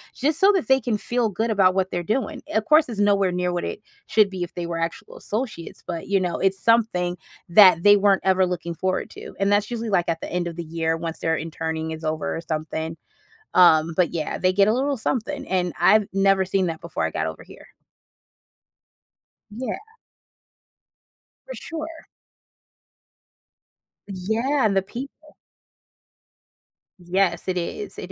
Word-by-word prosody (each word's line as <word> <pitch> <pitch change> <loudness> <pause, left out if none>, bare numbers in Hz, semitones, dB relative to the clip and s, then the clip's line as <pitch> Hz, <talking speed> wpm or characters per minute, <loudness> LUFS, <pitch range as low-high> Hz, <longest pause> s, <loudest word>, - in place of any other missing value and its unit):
Just 300 +4 0
so 395 +2 +6
that 375 - 0
they 265 0 +4
can 220 -2 -1
feel 235 +1 -1
good 220 +4 -1
about 190 -3 +3
what 190 -1 0
they're 175 - -2
doing. 265 - -2
Of 220 0 0
course, 305 -3 +4
it's 220 - -5
nowhere 200 -2 +3
near 180 0 -1
what 175 - -2
it - - -5 0.3
should 210 -3 +3
be 185 - -6
if 175 - -5
they 175 -1 -3
were 170 -1 -4
actual 165 0 -5
associates, 215 -6 -5
but, 170 -2 -5
you 200 0 +2
know, 180 -2 -2
it's 190 0 +1
something 200 -7 +2 0.3
that 180 -2 +7
they 205 0 +8
weren't 200 -1 +3
ever 190 -1 +4
looking 175 -1 -4
forward 185 +3 -2
to. - - -10
And 195 +1 +1
that's 205 0 +2
usually, 230 -2 -4
like, 175 -3 +2
at 165 - -1
the - - -7
end 180 -1 -1
of 170 - -6
the 170 - -5
year 165 0 -2
once 165 0 -5
their 160 0 0
interning 160 0 -4
is 160 0 -7
over 155 0 -2
or 165 - -4
something. 160 0 -4 0.6
Um, 165 -2 +5
but 180 -3 +2
yeah, 155 -2 -3
they 185 0 +1
get 200 +1 +4
a 215 - +3
little 275 +3 0
something. 265 +5 -3
And 180 -3 0
I've 215 +1 +5
never 195 -1 +3
seen 190 0 0
that 165 -1 -5
before 170 - -4
I 80 - +1
got 80 - -2
over 80 - -7
here. - - -15 1.9
Yeah. 235 +1 -4 1.7
For - - -7
sure. 325 0 -7 2.0
Yeah, 220 +8 0
and 200 - +2
the 195 - +3
people. 275 +9 -10 1.7
Yes, 180 +1 0
it 185 -1 -1
is, 180 - -5
it - - -7
190 Hz, 175 wpm, -23 LUFS, 170-220 Hz, 2.0 s, they